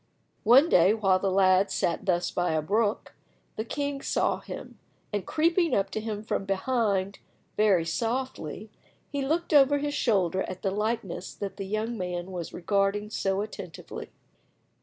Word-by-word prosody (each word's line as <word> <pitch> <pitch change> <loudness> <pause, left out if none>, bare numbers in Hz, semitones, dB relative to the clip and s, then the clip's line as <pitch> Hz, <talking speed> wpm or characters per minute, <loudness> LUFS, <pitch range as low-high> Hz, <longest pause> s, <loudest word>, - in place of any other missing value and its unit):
One 260 +8 +7
day 190 - +5
while 195 -4 +3
the 195 - 0
lad 190 0 +4
sat 170 - -1
thus 180 -1 +1
by 175 -2 0
a 155 - +1
brook, 210 +5 0 0.4
the 220 - -2
king 285 +3 -3
saw - - 0
him, - - -9 0.3
and 205 -3 -2
creeping 335 +2 +2
up 195 0 0
to 215 - -3
him 215 -1 -4
from 210 -2 -2
behind 195 -1 0 0.4
very 195 -6 +3
softly, 225 - -3 0.4
he 285 -2 -2
looked 320 +4 -1
over 285 0 +6
his 290 0 -2
shoulder 190 - +1
at 185 -1 -6
the 195 - +1
likeness 210 -2 -3
that 200 -1 -5
the 195 -2 -5
young 215 +2 -2
man 180 0 -4
was 175 -3 -5
regarding 200 +3 0
so 195 -1 0
attentively. 195 -7 -7
205 Hz, 160 wpm, -27 LUFS, 190-235 Hz, 0.4 s, One